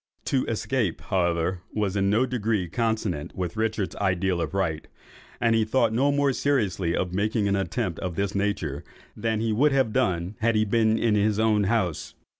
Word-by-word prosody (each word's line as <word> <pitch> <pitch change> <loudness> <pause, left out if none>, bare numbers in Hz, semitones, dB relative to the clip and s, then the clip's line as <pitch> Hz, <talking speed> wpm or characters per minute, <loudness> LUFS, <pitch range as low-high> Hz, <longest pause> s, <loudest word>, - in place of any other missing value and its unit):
To 130 -2 +1
escape, 110 -5 -1
however, 85 0 0
was 105 -2 0
in 100 -1 +2
no 110 +5 +3
degree 110 -6 -1
consonant 110 -5 -2
with 90 -1 -3
Richard's 110 -3 -1
idea 95 -1 +1
of 85 0 -3
right; 80 -6 -1 0.5
and 115 -1 +2
he 115 -1 +3
thought 115 0 +1
no 135 +5 +3
more 140 -1 +2
seriously 100 -12 0
of 90 -1 -2
making 105 +2 0
an 100 - +2
attempt 95 -2 -2
of 90 -3 -4
this 100 +2 -1
nature, 100 -8 -2 0.3
than 110 0 -1
he 115 -1 0
would 140 +6 +3
have 130 -5 +2
done 95 -6 0
had 115 +1 +2
he 110 0 +3
been 110 +1 +2
in 115 -1 +2
his 105 0 +2
own 110 -2 +2
house. 95 -7 -1
105 Hz, 185 wpm, -25 LUFS, 95-115 Hz, 0.5 s, no